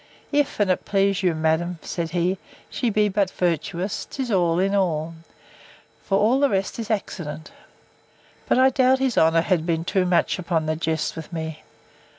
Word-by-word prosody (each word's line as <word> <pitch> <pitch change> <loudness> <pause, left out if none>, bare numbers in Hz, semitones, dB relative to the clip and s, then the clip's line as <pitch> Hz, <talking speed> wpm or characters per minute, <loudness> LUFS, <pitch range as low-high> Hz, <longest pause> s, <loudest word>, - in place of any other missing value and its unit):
If, 290 -3 0
and 185 -3 +1
please 195 -1 +1
you, 180 -4 +1
madam, 160 +2 0
said 170 -2 -3
he, 180 +3 0 0.3
she 245 - -1
be 210 0 +2
but 200 -1 +1
virtuous, 180 +2 -2
'tis 260 -3 -4
all 175 -4 +2
in 195 +2 +1
all: 165 -5 0 0.9
For 195 - +1
all 230 +7 +3
the 280 0 +3
rest 195 +2 -1
is 225 - -5
accident. 165 -7 -4 1.0
But - - +4
I 260 +1 +5
doubt 260 0 +4
his 265 -2 0
honour 165 +1 +4
has 175 -1 +1
been 165 0 -1
too 185 0 +1
much 180 +1 +1
upon 165 -3 -1
the 155 0 0
jest 160 0 -2
with 160 0 -8
me. 160 -2 -5
180 Hz, 170 wpm, -23 LUFS, 165-205 Hz, 1.0 s, I